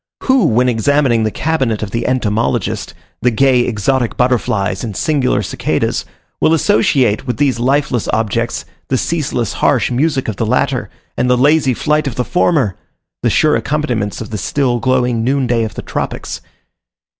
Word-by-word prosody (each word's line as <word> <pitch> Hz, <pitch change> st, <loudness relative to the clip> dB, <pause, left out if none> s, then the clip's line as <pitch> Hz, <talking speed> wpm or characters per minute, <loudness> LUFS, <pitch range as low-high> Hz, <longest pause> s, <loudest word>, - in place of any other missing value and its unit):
Who 260 Hz, -1 st, +3 dB
when 125 Hz, +2 st, +2 dB
examining 125 Hz, +1 st, +2 dB
in -, -, +1 dB
the -, -, +1 dB
cabinet 130 Hz, -5 st, -1 dB
of 105 Hz, -, -5 dB
the 115 Hz, 0 st, -2 dB
entomologist 115 Hz, -4 st, -1 dB, 0.3 s
the 125 Hz, -, +3 dB
gay 130 Hz, +2 st, +3 dB
exotic 120 Hz, +2 st, 0 dB
butterflies, 110 Hz, -6 st, 0 dB
and 110 Hz, -5 st, -5 dB
singular 145 Hz, -5 st, +1 dB
cicadas, -, -, -1 dB, 0.3 s
will 160 Hz, -, +3 dB
associate 140 Hz, -, +2 dB
with 120 Hz, -3 st, -2 dB
these 135 Hz, -3 st, +1 dB
lifeless 130 Hz, -1 st, 0 dB
objects, 115 Hz, +2 st, -1 dB, 0.2 s
the 130 Hz, -, +1 dB
ceaseless 140 Hz, -6 st, -1 dB
harsh 125 Hz, -3 st, +1 dB
music 135 Hz, +2 st, 0 dB
of 110 Hz, -3 st, -3 dB
the -, -, -1 dB
latter, 130 Hz, +2 st, 0 dB, 0.3 s
and 125 Hz, +1 st, 0 dB
the 125 Hz, -, +4 dB
lazy 145 Hz, -1 st, +3 dB
flight 150 Hz, +2 st, 0 dB
of 125 Hz, -, -4 dB
the 125 Hz, -, -1 dB
former, 145 Hz, -, +1 dB, 0.5 s
the -, -, +2 dB
sure 155 Hz, -1 st, +3 dB
accompaniments 115 Hz, -4 st, -2 dB
of 110 Hz, -, -7 dB
the 105 Hz, -, -3 dB
still, 125 Hz, -1 st, 0 dB
glowing 125 Hz, -2 st, +1 dB
noon 135 Hz, +2 st, +1 dB
day 120 Hz, -1 st, +1 dB
of 110 Hz, -, -5 dB
the -, -, -6 dB
tropics? -, -, -4 dB
125 Hz, 165 wpm, -16 LUFS, 115-140 Hz, 0.5 s, the